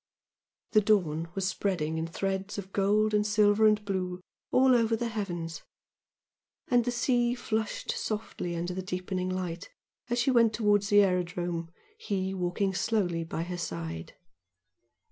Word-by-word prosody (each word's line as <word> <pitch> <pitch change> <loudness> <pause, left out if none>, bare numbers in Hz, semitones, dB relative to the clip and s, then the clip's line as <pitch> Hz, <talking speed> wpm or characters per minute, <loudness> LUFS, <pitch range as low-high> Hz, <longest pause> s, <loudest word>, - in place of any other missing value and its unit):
The 215 - +5
dawn 170 -6 +2
was 195 -1 0
spreading 160 -6 -1
in 165 - -2
threads 195 +4 -3
of 195 -1 -7
gold 210 +2 +2
and 210 0 +3
silver 210 0 +4
and 210 0 +2
blue 185 -2 -2 0.3
all 260 0 +5
over 230 -1 +3
the 235 +1 -2
heavens, 175 -7 -4 1.1
and 245 -2 +3
the 245 - 0
sea 240 0 +1
flushed 220 -3 -2
softly 210 -5 -3
under 175 +2 -3
the 190 - -3
deepening 185 0 -3
light, 180 -2 -4 0.4
as 240 - 0
she 245 +3 +3
went 230 -3 +4
towards 205 -2 +2
the 205 -1 +7
aerodrome, 175 -2 -1 0.3
he 190 - -2
walking 190 +1 -1
slowly 185 -5 0
by 165 0 -3
her 175 0 -5
side. 80 - -5
195 Hz, 145 wpm, -29 LUFS, 175-215 Hz, 1.1 s, the